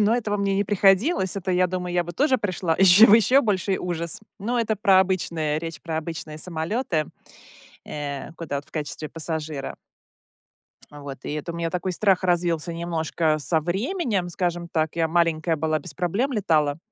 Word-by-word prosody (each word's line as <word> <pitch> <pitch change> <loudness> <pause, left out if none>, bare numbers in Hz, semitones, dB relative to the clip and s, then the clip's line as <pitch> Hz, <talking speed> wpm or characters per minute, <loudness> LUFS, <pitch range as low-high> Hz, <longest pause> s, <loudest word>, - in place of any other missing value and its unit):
Но 215 +3 +3
этого 210 -4 -1
мне 200 -1 0
не 200 - +1
приходилось. 195 - +2
Это, 190 -1 -3
я 180 0 +3
думаю, 180 0 -4
я 175 - +3
бы 175 - -7
тоже 265 - +2
пришла 185 -5 -1
еще 195 +4 +8
в 210 - +7
еще 240 +5 +5
больший 195 -4 0
ужас. 170 0 -3 0.2
Но 235 +5 -1
это 225 -2 +1
про 195 -2 +4
обычные 170 -5 -1
речь 165 -1 -6
про 165 -2 -4
обычные 160 -1 -6
самолеты, 170 - -2 0.8
э, 145 0 -5
куда 160 -4 -4
вот 140 - -5
в - - -23
качестве 155 0 -5
пассажира. 155 -3 -5 1.2
Вот, 145 -2 -8
и - - -4
это 150 +3 -4
у 170 - -7
меня 165 -1 -2
такой 180 +1 -2
страх 195 0 +2
развился 175 -2 0
немножко 165 -2 -1
со 160 +2 0
временем, 200 - -1
скажем 175 -1 -2
так, 160 -2 -1
я 165 -1 +1
маленькая 165 -1 +1
была- 155 +1 0
без 150 +1 -8
проблем 195 - -1
летала. 155 - +1
175 Hz, 175 wpm, -24 LUFS, 160-195 Hz, 1.2 s, еще